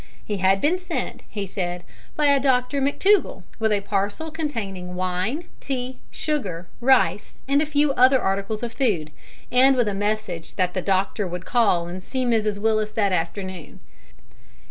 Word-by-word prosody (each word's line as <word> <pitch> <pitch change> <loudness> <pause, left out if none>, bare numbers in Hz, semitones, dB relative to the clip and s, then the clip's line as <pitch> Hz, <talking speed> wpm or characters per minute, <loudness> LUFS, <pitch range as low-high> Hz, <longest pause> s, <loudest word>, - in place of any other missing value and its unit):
He 210 - -2
had 190 +1 +3
been 350 +5 +2
sent, 360 -2 -4
he 205 -2 -4
said, 180 -2 -4 0.3
by 300 - +1
a 280 -1 +5
Dr 265 +1 +1
McTougall 310 - +2 0.2
with 220 -1 +1
a 205 -1 +2
parcel 205 +10 -2
containing 205 - -4
wine, 185 - -1 0.2
tea, 255 -1 -4
sugar, 190 - -3
rice, 205 -7 +2
and 280 +1 +3
a 310 - 0
few 295 -1 +2
other 260 +1 +5
articles 200 +2 -1
of 235 -1 -3
food, 190 - 0 0.4
and 265 +2 +6
with 245 -3 +2
a 205 - 0
message 200 -4 -3
that 180 -1 0
the 185 - -1
doctor 195 +1 0
would 180 +1 -6
call 205 -8 +2
and 180 +2 -6
see 255 +6 -2
Mrs 215 -3 +1
Willis 215 0 0
that 205 -3 +1
afternoon. 185 0 -3
215 Hz, 165 wpm, -23 LUFS, 185-265 Hz, 0.4 s, and